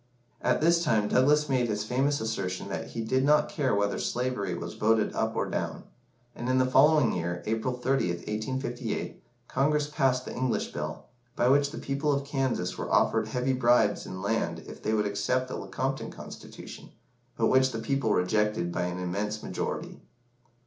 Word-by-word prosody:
At 125 Hz, +3 st, +2 dB
this 170 Hz, +1 st, +4 dB
time 110 Hz, -8 st, +2 dB
Douglas 150 Hz, +4 st, +4 dB
made 130 Hz, -3 st, +1 dB
his 105 Hz, -1 st, -1 dB
famous 135 Hz, +5 st, +1 dB
assertion 100 Hz, -5 st, -3 dB
that -, -, -4 dB
he 115 Hz, -, -4 dB
did 130 Hz, +4 st, +1 dB
not 150 Hz, +1 st, +4 dB
care 140 Hz, -8 st, 0 dB
whether 100 Hz, 0 st, 0 dB
slavery 120 Hz, -7 st, -1 dB
was 85 Hz, 0 st, -6 dB
voted 110 Hz, 0 st, +2 dB
up 110 Hz, 0 st, -1 dB
or -, -, 0 dB
down; -, -, -3 dB, 0.5 s
and 120 Hz, -, -4 dB
in 130 Hz, -, +3 dB
the 130 Hz, -, +4 dB
following 135 Hz, +1 st, +5 dB
year, 85 Hz, 0 st, -3 dB
April 115 Hz, +3 st, -1 dB
30th, 125 Hz, -9 st, 0 dB
1858, 120 Hz, +2 st, -3 dB, 0.3 s
Congress 145 Hz, +2 st, +1 dB
passed 130 Hz, -4 st, +1 dB
the -, -, -6 dB
English 130 Hz, -1 st, -1 dB
Bill, 75 Hz, +1 st, -5 dB, 0.3 s
by 125 Hz, -, +3 dB
which 140 Hz, +1 st, +4 dB
the 150 Hz, -, -8 dB
people 140 Hz, +2 st, -1 dB
of 140 Hz, -1 st, 0 dB
Kansas 135 Hz, -10 st, -1 dB
were -, -, -4 dB
offered 110 Hz, -1 st, +3 dB
heavy 125 Hz, +3 st, 0 dB
bribes 120 Hz, -4 st, +3 dB
in 95 Hz, 0 st, -6 dB
land 110 Hz, +3 st, -1 dB
if -, -, -10 dB
they 110 Hz, -, 0 dB
would 105 Hz, -1 st, +1 dB
accept 130 Hz, +5 st, 0 dB
the -, -, -5 dB
Lecompton 135 Hz, +1 st, -3 dB
Constitution, -, -, -10 dB, 0.5 s
but -, -, +2 dB
which 130 Hz, 0 st, +4 dB
the 115 Hz, -, -4 dB
people 130 Hz, 0 st, 0 dB
rejected 105 Hz, -1 st, +1 dB
by 90 Hz, -, -1 dB
an 90 Hz, 0 st, -3 dB
immense 100 Hz, +4 st, -3 dB
majority. -, -, -4 dB
125 Hz, 175 wpm, -28 LUFS, 105-135 Hz, 0.5 s, following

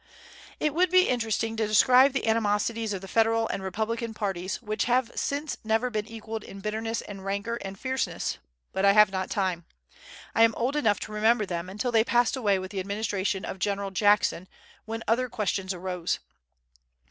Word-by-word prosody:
It 300 Hz, -2 st, 0 dB
would 360 Hz, +3 st, +3 dB
be 370 Hz, +1 st, +5 dB
interesting 225 Hz, -2 st, 0 dB
to 220 Hz, -1 st, +1 dB
describe 255 Hz, +5 st, +6 dB
the 265 Hz, -, -1 dB
animosities 220 Hz, 0 st, +1 dB
of 195 Hz, -2 st, -3 dB
the 195 Hz, -, -9 dB
Federal 225 Hz, +2 st, +2 dB
and -, -, -3 dB
Republican 220 Hz, +4 st, -3 dB
parties, 190 Hz, -3 st, -3 dB
which 215 Hz, -3 st, -2 dB
have 245 Hz, 0 st, +1 dB
since 290 Hz, +2 st, -2 dB
never 225 Hz, +3 st, +1 dB
been 215 Hz, -1 st, -2 dB
equalled 225 Hz, -1 st, -6 dB
in 195 Hz, -, -10 dB
bitterness 220 Hz, +2 st, -3 dB
and 195 Hz, -2 st, -9 dB
rancor 200 Hz, +4 st, -2 dB
and 195 Hz, -3 st, -7 dB
fierceness, 260 Hz, +3 st, -2 dB, 0.3 s
but 190 Hz, -, -1 dB
I 200 Hz, 0 st, +6 dB
have 210 Hz, -1 st, +6 dB
not 190 Hz, -1 st, -3 dB
time. 185 Hz, -4 st, -1 dB, 0.7 s
I -, -, +2 dB
am 230 Hz, -1 st, +5 dB
old 255 Hz, +5 st, -1 dB
enough 220 Hz, -9 st, +2 dB
to -, -, -6 dB
remember 215 Hz, +1 st, +2 dB
them, 175 Hz, -1 st, -4 dB
until 210 Hz, +6 st, -2 dB
they 225 Hz, -1 st, +4 dB
passed 240 Hz, +1 st, +2 dB
away 210 Hz, -7 st, +2 dB
with 185 Hz, 0 st, -6 dB
the 200 Hz, -, -3 dB
administration 200 Hz, 0 st, -2 dB
of 190 Hz, -, -6 dB
General 200 Hz, 0 st, -1 dB
Jackson, 205 Hz, -2 st, +2 dB, 0.4 s
when 225 Hz, 0 st, -5 dB
other 245 Hz, +3 st, +1 dB
questions 200 Hz, -4 st, -2 dB
arose. 180 Hz, -1 st, -2 dB
215 Hz, 180 wpm, -27 LUFS, 195-230 Hz, 0.7 s, describe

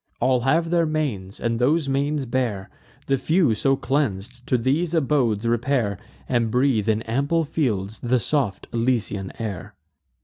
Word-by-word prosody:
All 130 Hz, -1 st, +3 dB
have 165 Hz, +7 st, +1 dB
their 170 Hz, -2 st, +3 dB
manes, 125 Hz, -12 st, -3 dB
and 115 Hz, -1 st, -1 dB
those 145 Hz, +4 st, +2 dB
manes 140 Hz, +1 st, 0 dB
bear: 115 Hz, -6 st, -2 dB, 0.3 s
The 135 Hz, -1 st, +1 dB
few, 160 Hz, -6 st, +2 dB
so 135 Hz, +6 st, +2 dB
cleans'd, 125 Hz, -3 st, -2 dB
to 125 Hz, -, +2 dB
these 150 Hz, +8 st, 0 dB
abodes 130 Hz, -8 st, +1 dB
repair, 115 Hz, -4 st, 0 dB, 0.3 s
And 120 Hz, -3 st, +1 dB
breathe, 125 Hz, -3 st, +2 dB
in 110 Hz, +1 st, +1 dB
ample 140 Hz, +8 st, 0 dB
fields, 110 Hz, -10 st, -2 dB
the 125 Hz, +1 st, +1 dB
soft 120 Hz, -4 st, -1 dB
Elysian 115 Hz, -5 st, -1 dB
air. 105 Hz, -7 st, -5 dB
125 Hz, 145 wpm, -23 LUFS, 110-140 Hz, 0.3 s, All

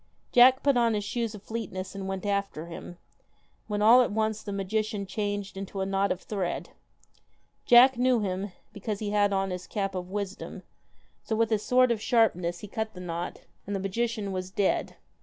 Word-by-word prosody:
Jack 255 Hz, +2 st, +7 dB
put 280 Hz, -3 st, +3 dB
on 230 Hz, -2 st, +3 dB
his 205 Hz, -, -1 dB
shoes 230 Hz, +1 st, -2 dB
of 205 Hz, -, -12 dB
swiftness 190 Hz, -5 st, -5 dB
and 195 Hz, -1 st, -5 dB
went 190 Hz, +1 st, -4 dB
after 200 Hz, -5 st, -1 dB
him, 170 Hz, +1 st, -9 dB, 0.7 s
when 210 Hz, -1 st, -1 dB
all 235 Hz, +4 st, +8 dB
at 245 Hz, -, +1 dB
once 220 Hz, 0 st, 0 dB
the 205 Hz, -, -6 dB
magician 200 Hz, +1 st, -2 dB
changed 205 Hz, 0 st, -3 dB
into 195 Hz, 0 st, -6 dB
a 190 Hz, -, 0 dB
knot 195 Hz, +1 st, +1 dB
of 180 Hz, -, -2 dB
thread. 195 Hz, -5 st, -3 dB, 1.0 s
Jack 245 Hz, +1 st, +7 dB
knew 250 Hz, -1 st, +3 dB
him, 195 Hz, -1 st, -2 dB, 0.2 s
because 205 Hz, 0 st, -4 dB
he 205 Hz, 0 st, -3 dB
had 205 Hz, -1 st, +3 dB
on 195 Hz, -1 st, 0 dB
his 180 Hz, 0 st, -5 dB
cap 195 Hz, -2 st, -2 dB
of 180 Hz, -1 st, -5 dB
wisdom, 200 Hz, 0 st, -5 dB, 0.6 s
so 220 Hz, -, -2 dB
with 225 Hz, 0 st, +1 dB
his 215 Hz, -2 st, +2 dB
sword 250 Hz, +2 st, +4 dB
of 225 Hz, -2 st, -1 dB
sharpness, 180 Hz, -8 st, +2 dB
he 210 Hz, -, -7 dB
cut 220 Hz, +1 st, -4 dB
the -, -, -8 dB
knot, 175 Hz, -1 st, -5 dB, 0.3 s
and 205 Hz, -, -2 dB
the -, -, -1 dB
magician 210 Hz, +1 st, -2 dB
was 185 Hz, -1 st, -4 dB
dead. 195 Hz, 0 st, 0 dB
205 Hz, 195 wpm, -28 LUFS, 190-220 Hz, 1.0 s, all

